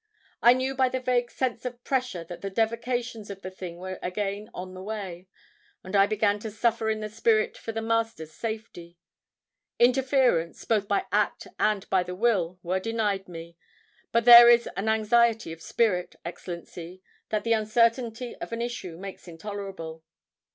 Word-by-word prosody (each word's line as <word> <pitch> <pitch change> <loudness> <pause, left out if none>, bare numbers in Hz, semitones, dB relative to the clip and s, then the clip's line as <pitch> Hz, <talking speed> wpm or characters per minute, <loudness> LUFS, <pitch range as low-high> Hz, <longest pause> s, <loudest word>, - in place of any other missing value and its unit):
"I 240 - +8
knew 260 +1 -1
by 260 -1 +2
the 260 - -2
vague 245 -1 0
sense 245 -3 -2
of 245 -1 -6
pressure 250 -10 -1
that 175 +1 -9
the 195 - -3
devocations 230 +1 -2
of 195 -1 -8
the 185 - -6
thing 180 -2 -8
were 185 +1 -6
again 200 +3 -3
on 185 +1 -7
the 185 - -9
way. 190 -3 -6 0.6
And 185 +2 -5
I 200 0 +6
began 210 -1 +1
to 220 - -5
suffer 225 +1 0
in 215 0 -1
the 215 - -3
spirit 440 - +1
for 230 - -6
the 225 0 -4
Master's 225 -8 -1
safety. 220 -7 -6 0.8
Interference, 255 - +2
both 210 -3 +1
by 200 - +1
act 210 +1 0
and 210 -2 +1
by 190 -1 +4
the 180 0 -5
will, 185 -5 +1
were 185 +2 0
denied 210 -2 -1
me. 170 -1 -10 0.5
But 230 0 +2
there 240 0 +11
is 235 0 +5
an 215 +3 -1
anxiety 225 -2 +2
of 165 - -13
spirit, 185 -5 0
Excellency, 175 +1 -8 0.3
that 215 -1 -1
the 230 - +2
uncertainty 230 +2 +1
of - - -7
an 230 - -3
issue 200 -9 -5
makes 195 0 -9
intolerable." 170 -2 -7
215 Hz, 170 wpm, -27 LUFS, 185-235 Hz, 0.8 s, there